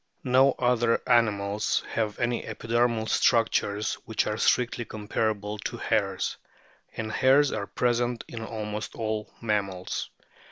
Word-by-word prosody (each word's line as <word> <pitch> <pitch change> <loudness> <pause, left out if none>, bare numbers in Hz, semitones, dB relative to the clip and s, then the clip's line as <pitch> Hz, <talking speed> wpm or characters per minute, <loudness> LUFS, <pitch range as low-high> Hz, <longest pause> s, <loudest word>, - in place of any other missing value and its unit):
No 130 +1 +5
other 120 -2 +2
animals 105 -3 +2
have 110 -2 -1
any 120 0 0
epidermal 115 -1 0
structures 110 -3 +2
which 110 - 0
are 105 - -1
strictly 120 +2 +1
comparable 105 -1 -2
to - - -4
hairs; - - 0 0.6
and 110 -1 -3
hairs 135 +4 +4
are 100 -2 -3
present 120 +3 0
in 115 -1 -6
almost 105 -1 -5
all 110 -1 -3
mammals. 100 -5 -2
110 Hz, 120 wpm, -27 LUFS, 105-120 Hz, 0.6 s, No